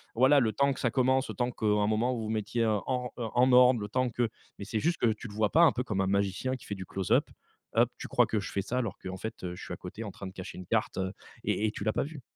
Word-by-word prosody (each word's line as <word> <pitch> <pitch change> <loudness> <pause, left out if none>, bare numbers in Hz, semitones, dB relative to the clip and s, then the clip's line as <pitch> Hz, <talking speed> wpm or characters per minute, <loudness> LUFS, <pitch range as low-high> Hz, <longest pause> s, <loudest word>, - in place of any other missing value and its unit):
Voilà 130 +5 +6
le 110 -4 +1
temps 140 +5 +2
que 130 - -10
ça 120 - +1
commence, 130 +1 +2
le - - -5
temps 125 0 0
qu'à 110 - -5
un 105 0 +3
moment 110 +4 +1
vous 115 - -4
vous, 110 - -4
heu, - - 0
mettiez 115 +2 0
en, 125 +4 -1
heu, - - -2
en 125 +1 +5
ordre, 125 -1 +7
le 105 - -4
temps 130 +3 +1
que 120 0 0 0.3
mais 100 - -5
c'est 110 +2 -2
juste 170 +7 +1
que 115 -2 +2
tu 105 - -9
le 105 - -10
vois 105 -1 +1
pas, 165 - +5
un 165 - +7
peu 125 - -2
comme 105 -6 -1
un 95 - +1
magicien 100 +6 0
qui 130 - -12
fait - - -4
du 95 -1 -7
close-up 95 -1 +1 0.5
up. - - +4
Tu - - -6
crois - - +4
que 110 - -1
je 100 - -6
fais 100 - -1
ça 125 +5 -1
alors 115 -6 -3
qu'en 95 0 -6
fait, 95 -3 -5
je - - -10
suis - - -6
à - - -6
côté 95 +5 -7
en 105 - -5
train 100 - -9
de 95 - -9
cacher 95 - -8
une 90 - -8
carte - - 0 0.5
et 110 - +1
et - - -1
tu 105 - -6
l'as 110 +1 +1
pas - - 0
vu. 145 -1 -8
110 Hz, 315 wpm, -29 LUFS, 105-125 Hz, 0.5 s, ordre